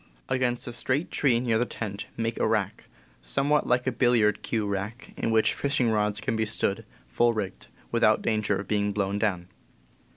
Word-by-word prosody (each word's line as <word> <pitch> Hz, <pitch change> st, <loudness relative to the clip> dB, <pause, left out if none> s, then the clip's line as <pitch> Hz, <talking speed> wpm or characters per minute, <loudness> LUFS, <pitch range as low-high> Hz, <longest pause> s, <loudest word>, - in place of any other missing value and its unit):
Against 125 Hz, -2 st, 0 dB
a 120 Hz, -, -5 dB
straight 130 Hz, +6 st, -1 dB
tree 125 Hz, -5 st, +2 dB
near 115 Hz, -2 st, +1 dB
the 120 Hz, -, +2 dB
tent 100 Hz, -3 st, -5 dB
make 115 Hz, 0 st, -2 dB
a -, -, +2 dB
rack, 110 Hz, -3 st, -1 dB, 0.4 s
somewhat 140 Hz, -, +1 dB
like 125 Hz, 0 st, +2 dB
a 130 Hz, -, +1 dB
billiard 120 Hz, -5 st, +2 dB
cue 110 Hz, -3 st, -1 dB
rack, 100 Hz, +4 st, -4 dB
in -, -, -2 dB
which 110 Hz, -1 st, +3 dB
fishing 140 Hz, -5 st, +1 dB
rods 105 Hz, -1 st, +1 dB
can 120 Hz, +1 st, -2 dB
be 110 Hz, -, +1 dB
stood, 105 Hz, -2 st, -1 dB, 0.2 s
full 120 Hz, 0 st, +2 dB
rigged, 100 Hz, -4 st, -4 dB, 0.2 s
without -, -, +3 dB
danger 110 Hz, -2 st, +1 dB
of 100 Hz, -, -6 dB
being 105 Hz, -1 st, 0 dB
blown 100 Hz, 0 st, -1 dB
down. 95 Hz, -5 st, -1 dB
110 Hz, 185 wpm, -27 LUFS, 105-120 Hz, 0.4 s, which